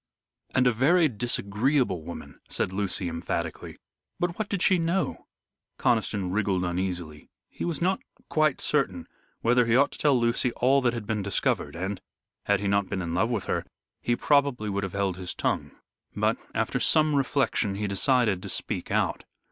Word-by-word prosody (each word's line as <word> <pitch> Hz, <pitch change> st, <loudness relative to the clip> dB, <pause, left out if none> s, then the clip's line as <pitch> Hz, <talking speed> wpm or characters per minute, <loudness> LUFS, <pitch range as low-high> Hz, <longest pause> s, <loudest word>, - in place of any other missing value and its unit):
"And 130 Hz, -1 st, +4 dB
a 125 Hz, -, +5 dB
very 155 Hz, +9 st, +4 dB
disagreeable 120 Hz, -, 0 dB
woman," 85 Hz, +2 st, -9 dB
said 95 Hz, -, -1 dB
Lucy, 95 Hz, -2 st, 0 dB
emphatically. 85 Hz, 0 st, -4 dB, 0.4 s
"But 175 Hz, +2 st, -1 dB
what 215 Hz, -, -2 dB
did 195 Hz, -3 st, 0 dB
she 185 Hz, -2 st, +4 dB
know?" 170 Hz, +3 st, -1 dB, 0.5 s
Conniston 105 Hz, -6 st, +1 dB
wriggled 95 Hz, -2 st, 0 dB
uneasily. 90 Hz, -4 st, -4 dB, 0.2 s
He -, -, -5 dB
was 170 Hz, -1 st, -2 dB
not 190 Hz, +1 st, +2 dB, 0.3 s
quite 155 Hz, -3 st, +1 dB
certain 95 Hz, -, 0 dB, 0.3 s
whether 120 Hz, 0 st, +3 dB
he 115 Hz, -, +3 dB
ought 140 Hz, +3 st, +4 dB
to -, -, -10 dB
tell 140 Hz, -4 st, +3 dB
Lucy 120 Hz, +1 st, +1 dB
all 135 Hz, +3 st, +3 dB
that 120 Hz, -2 st, +2 dB
had 115 Hz, -3 st, -5 dB
been 105 Hz, 0 st, -1 dB
discovered, 100 Hz, -3 st, 0 dB
and, 95 Hz, +2 st, -4 dB, 0.4 s
had 100 Hz, -1 st, +2 dB
he 105 Hz, -, -1 dB
not 100 Hz, -1 st, +1 dB
been 95 Hz, -, -2 dB
in 85 Hz, -1 st, -3 dB
love 95 Hz, +7 st, +1 dB
with 115 Hz, -5 st, -1 dB
her, -, -, -1 dB, 0.4 s
he 120 Hz, -, +1 dB
would -, -, -17 dB
probably 140 Hz, -7 st, +2 dB
have 95 Hz, -2 st, -4 dB
held 100 Hz, -2 st, -1 dB
his 90 Hz, -1 st, -5 dB
tongue. -, -, -1 dB, 0.5 s
But, -, -, +1 dB, 0.2 s
after -, -, 0 dB
some 155 Hz, -1 st, +3 dB
reflection, 135 Hz, -7 st, +1 dB
he 105 Hz, +1 st, -2 dB
decided 105 Hz, 0 st, +2 dB
to 100 Hz, -, -7 dB
speak -, -, -3 dB
out. -, -, 0 dB
110 Hz, 175 wpm, -27 LUFS, 95-140 Hz, 0.5 s, a